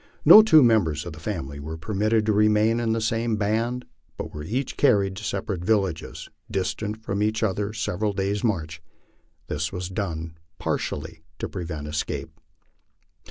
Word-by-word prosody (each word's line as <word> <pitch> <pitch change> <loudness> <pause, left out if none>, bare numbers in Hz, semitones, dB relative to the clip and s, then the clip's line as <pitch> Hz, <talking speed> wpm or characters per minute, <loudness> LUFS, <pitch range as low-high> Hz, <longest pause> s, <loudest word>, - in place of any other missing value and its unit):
No 215 - +11
two 160 -9 +6
members 100 - +2
of 85 - -6
the 80 - -11
family 80 -7 -5
were 80 +3 -6
permitted 105 +4 0
to 110 - +2
remain 105 +2 +3
in 115 -1 0
the 115 - +1
same 115 +1 0
band, 115 +4 -1 0.3
but - - -6
were 75 - -6
each 125 - -3
carried 100 -2 +3
to 110 - -7
separate 100 -4 -3
villages, 95 -5 -1 0.2
distant 105 +3 -3
from 100 -1 -2
each 110 +1 0
other 105 0 0
several 105 -1 -1
days' 100 +2 -2
march. 80 -8 -2 0.6
This 75 +1 -3
was 90 -1 -4
done 85 -5 -4 0.2
partly 80 +2 -3 0.2
to - - -3
prevent 80 -4 -5
escape. 75 +1 -3
100 Hz, 160 wpm, -25 LUFS, 85-110 Hz, 0.6 s, No